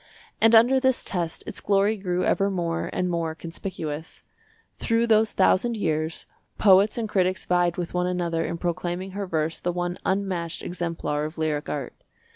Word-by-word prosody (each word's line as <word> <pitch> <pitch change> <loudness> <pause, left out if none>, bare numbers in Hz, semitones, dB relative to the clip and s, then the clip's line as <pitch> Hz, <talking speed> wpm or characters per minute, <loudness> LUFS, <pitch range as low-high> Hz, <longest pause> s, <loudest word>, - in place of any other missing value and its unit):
And 225 +1 +6
under 245 +4 +6
this 260 -1 +2
test 170 -4 -3
its - - -5
glory 200 +2 +2
grew 180 -3 -2
ever 200 0 +2
more 170 -3 -2
and 180 - -1
more 165 -2 -2
conspicuous. 165 -2 -6 0.5
Through 230 0 +1
those 220 -1 +3
thousand 220 +4 +2
years 160 -3 -2 0.3
poets 200 +2 +5
and 230 -2 -1
critics 185 -2 0
vied 175 -1 +2
with 175 -2 -4
one 180 0 0
another 170 -2 -1
in 170 +1 -3
proclaiming 175 +2 -3
her 200 0 -4
verse 160 -1 -1
the 175 - -1
one 175 0 -3
unmatched 185 -4 -2
exemplar 165 -4 -2
of 155 +2 -7
lyric 155 -2 -1
art. - - -4
180 Hz, 165 wpm, -25 LUFS, 165-200 Hz, 0.5 s, And